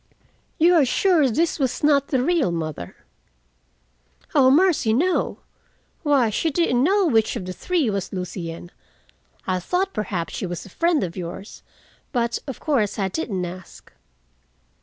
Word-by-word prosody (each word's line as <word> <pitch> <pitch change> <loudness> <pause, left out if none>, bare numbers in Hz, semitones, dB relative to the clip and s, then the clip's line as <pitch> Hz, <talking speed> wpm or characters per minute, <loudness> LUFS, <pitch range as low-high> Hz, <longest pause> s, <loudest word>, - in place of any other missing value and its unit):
"You 340 +3 +5
are 325 -4 +5
sure 310 +2 +3
this 325 +7 0
was 265 0 -1
not 285 -2 +3
the 260 -3 0
real 330 - +1
mother?" 155 - -5 1.4
"O 265 -2 +5
mercy, 300 -6 +3
no! 350 +10 0 0.6
Why, 275 -8 +2
she 325 +10 0
didn't 275 -6 +1
know 390 +5 +3
which 225 -8 +2
of 205 -6 -5
the 185 - -5
three 340 - 0
was 200 -3 -2
Lucien. 175 -2 -6 0.7
I 185 -1 0
thought 365 - -1
perhaps 185 -5 -3
she 190 - -3
was 175 -1 -6
a - - -12
friend 335 - +1
of 170 -2 -4
yours, 185 +3 -7 0.5
but, 235 -2 0
of 270 - -6
course, 250 -10 0
I 195 -2 0
didn't 190 - -3
ask." 180 +1 -11
245 Hz, 150 wpm, -23 LUFS, -, 1.4 s, You